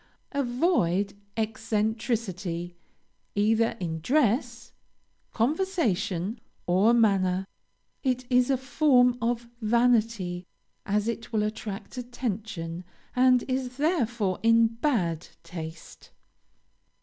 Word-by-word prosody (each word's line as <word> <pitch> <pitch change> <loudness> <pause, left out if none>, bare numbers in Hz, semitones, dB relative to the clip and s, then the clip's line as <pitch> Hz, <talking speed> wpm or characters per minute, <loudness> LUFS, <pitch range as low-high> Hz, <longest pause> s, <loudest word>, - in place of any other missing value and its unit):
Avoid 240 - +1 0.2
eccentricity 215 -5 -2 0.6
either 220 +2 +2
in 165 -3 -3
dress, 240 - +1 0.6
conversation, 230 - 0 0.3
or 190 +6 +4
manner. 195 -5 +3 0.6
It 255 -2 0
is 250 0 +3
a 270 - +3
form 250 -1 +3
of 235 0 -1
vanity, 220 -6 +1 0.4
as 210 +1 +1
it 230 0 -4
will 215 -2 +1
attract 210 0 -5
attention, 215 -8 -4 0.3
and 255 -1 +5
is 255 -1 -3
therefore 240 - 0
in 230 0 +5
bad 220 - -1 0.2
taste. 165 -1 -9
225 Hz, 90 wpm, -27 LUFS, 195-245 Hz, 0.6 s, and